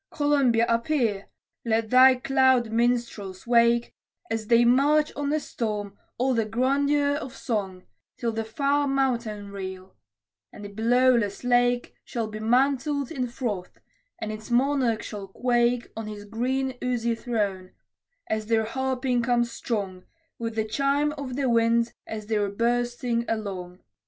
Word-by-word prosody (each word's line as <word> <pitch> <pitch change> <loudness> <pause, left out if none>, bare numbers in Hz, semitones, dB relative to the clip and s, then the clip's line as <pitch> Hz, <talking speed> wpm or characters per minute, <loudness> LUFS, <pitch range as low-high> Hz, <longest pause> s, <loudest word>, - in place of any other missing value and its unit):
Columbia, 280 -6 +2
appear! 230 -4 0 0.4
Let 225 -1 0
thy 255 +1 +7
cloud 260 -2 +2
minstrels 230 -5 -1
wake, 235 0 +3 0.4
As 225 -1 -2
they 235 +1 +5
march 290 +5 +3
on 285 -1 -2
the 305 +1 +1
storm, 210 -7 -4 0.2
all 260 +2 +1
the 230 -2 +2
grandeur 280 +5 +1
of 270 -3 -7
song, 195 -6 -3 0.3
Till 235 - -1
the 225 0 -3
far 280 +6 0
mountain 235 -7 -1
reel 190 -1 -7 0.6
and 205 - -10
the - - -7
billowless 230 0 +2
lake 245 0 +2
Shall 230 -2 -3
be 215 0 -7
mantled 270 +4 +1
in 255 -5 -2
froth, 225 -7 -4 0.4
and 215 - -4
its 215 0 -8
Monarch 250 -2 +1
shall 205 -2 -7
quake 240 +3 0
On 225 -1 -5
his 205 -1 -8
green 255 +4 -2
oozy 235 -2 0
throne, 205 -6 -2 0.6
as 215 -1 -2
their 225 -1 +2
harping 260 +1 -1
comes 240 0 +1
strong, 200 -6 -4 0.3
With 230 -1 -4
the 220 -1 0
chime 280 +5 +1
of 280 -4 -6
the 275 -1 0
winds 230 0 +2
as 215 -1 -6
they're 210 -2 0
bursting 240 +2 0
along. 190 -5 -4
235 Hz, 140 wpm, -26 LUFS, 215-260 Hz, 0.6 s, thy